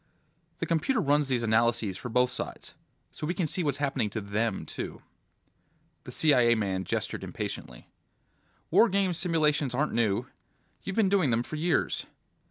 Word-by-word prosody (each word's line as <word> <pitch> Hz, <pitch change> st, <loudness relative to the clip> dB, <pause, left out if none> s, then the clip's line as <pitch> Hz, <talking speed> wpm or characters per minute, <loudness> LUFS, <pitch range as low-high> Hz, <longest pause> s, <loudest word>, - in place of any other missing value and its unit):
"The 165 Hz, -, -2 dB
computer 165 Hz, -, +1 dB
runs 145 Hz, -4 st, +2 dB
these 125 Hz, -3 st, 0 dB
analyses 115 Hz, -2 st, +2 dB
for 125 Hz, -, -6 dB
both 125 Hz, +1 st, +2 dB
sides, 125 Hz, -, -6 dB, 0.4 s
so 150 Hz, -, -5 dB
we 175 Hz, -, -1 dB
can 180 Hz, -, 0 dB
see 170 Hz, +4 st, -1 dB
what's 145 Hz, -3 st, 0 dB
happening 135 Hz, -6 st, 0 dB
to 110 Hz, -, -3 dB
Them, 105 Hz, +1 st, -2 dB
too." -, -, -6 dB, 1.0 s
The -, -, -8 dB
CIA 125 Hz, -6 st, +4 dB
man 95 Hz, -3 st, -1 dB
gestured -, -, -2 dB
impatiently. -, -, -6 dB, 0.8 s
"War 235 Hz, -, +6 dB
games 190 Hz, -3 st, +1 dB
simulations 150 Hz, -6 st, +1 dB
aren't 150 Hz, +4 st, 0 dB
new. 110 Hz, -4 st, +1 dB, 0.6 s
You've 195 Hz, -, -5 dB
been 220 Hz, -3 st, +3 dB
doing 190 Hz, -7 st, +3 dB
them 115 Hz, 0 st, +1 dB
for 155 Hz, -, -7 dB
years." 160 Hz, +2 st, 0 dB
140 Hz, 160 wpm, -28 LUFS, 115-165 Hz, 1.0 s, War